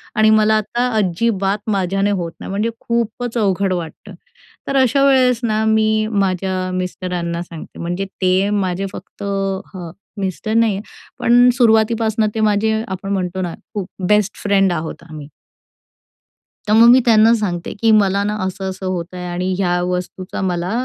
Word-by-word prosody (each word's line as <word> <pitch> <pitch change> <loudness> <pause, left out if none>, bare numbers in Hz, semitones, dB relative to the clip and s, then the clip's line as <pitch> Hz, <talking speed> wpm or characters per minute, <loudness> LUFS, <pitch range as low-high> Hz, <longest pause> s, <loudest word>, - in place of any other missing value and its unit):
आणि 215 0 +4
मला 215 0 +4
आता 240 +4 -1
अजिबात 195 +1 0
माझ्याने 195 +1 0
होत 175 -4 -2
नाही - - -8
म्हणजे 210 +4 -1
खूपच 235 +1 -2
अवघड 195 -2 +1
वाटतं. 175 +3 -7 0.5
तर 275 - -2
अशा 270 +2 +2
वेळेस 255 -3 +4
ना 220 -1 0
मी 220 0 +2
माझ्या 185 -2 -1
मिस्टरांना 180 -2 -3
सांगते. 170 -2 -11
म्हणजे 175 +3 -3 0.2
ते 185 +2 +2
माझे 195 -2 -1
फक्त - - -10
हां, 195 -3 -4 0.3
मिस्टर 195 +3 -3
नाहीये 220 -3 +2 0.4
पण 245 +1 +5
सुरुवातीपासनं 220 -2 +2
ते - - -1
माझे 215 +1 +1
आपण 195 +1 -5
म्हणतो 185 -1 -2
ना, 175 -2 -3 0.2
खूप 200 -3 -4 0.2
बेस्ट 210 -1 +2
फ्रेंड 195 -2 +3
आहोत 160 -1 -5
आम्ही. 150 -2 -9 1.4
तर 210 - +2
मग 230 +2 +7
मी 250 +2 +7
त्यांना 225 -1 +5
सांगते 180 -5 -3
की 225 - +4
मला 200 -2 +3
ना 210 +1 -1
असं-असं 190 0 -5
होत 180 -2 -2
आहे 180 0 -6
आणि 180 +1 -2
ह्या 180 -2 +1
वस्तूचा 180 +1 -4
मला 180 0 -2
195 Hz, 155 wpm, -18 LUFS, 185-220 Hz, 1.4 s, मग